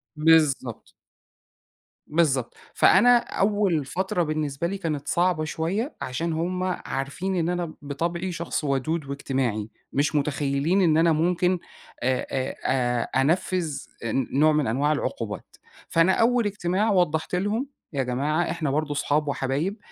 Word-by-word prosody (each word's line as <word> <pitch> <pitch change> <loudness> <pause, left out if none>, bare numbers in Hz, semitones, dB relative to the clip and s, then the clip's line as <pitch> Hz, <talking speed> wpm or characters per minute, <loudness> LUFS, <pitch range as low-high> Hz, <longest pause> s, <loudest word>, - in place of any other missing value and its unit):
بالضبط. 150 -6 +2 1.2
بالضبط، 145 -6 +1 0.2
فأنا 245 0 +6
أول 200 - 0
فترة 180 +2 -1
بالنسبة 155 0 -2
لي 200 +2 -3
كانت 155 -6 -3
صعبة 175 -2 +1
شوية 185 - -2
عشان 160 +6 -2
هُم 180 +3 -2
عارفين 180 +1 -3
إن 170 -1 0
أنا 175 -2 -2
بطبعي 170 +6 -3
شخص 165 -2 -3
وَدود 145 +3 -1
واجتماعي، 130 -6 -2 0.2
مش 145 +2 +1
مُتخيّلين 145 +5 +1
إن 160 -3 +4
أنا 165 0 +4
ممكن 180 +3 +2 0.5
أ - - -1
أ 130 +1 -1
آآ، 125 -1 +1
أنفّذ 165 0 0 0.3
آآ، 115 - -2 0.2
نوع 155 +3 +5
من 150 -4 +1
أنواع 140 +6 +1
العقوبات، 115 -7 -4 0.3
فأنا 165 +3 +4
أول 235 0 +3
اجتماع 205 +1 0
وضّحت 175 -2 +1
لهم 210 +8 -1 0.3
يا 135 -1 0
جماعة 145 +7 0
إحنا 155 -5 -2
برضو 150 0 -1
صحاب 150 +1 0
وحبايب، 140 +9 -1
155 Hz, 135 wpm, -25 LUFS, 140-180 Hz, 1.2 s, فأنا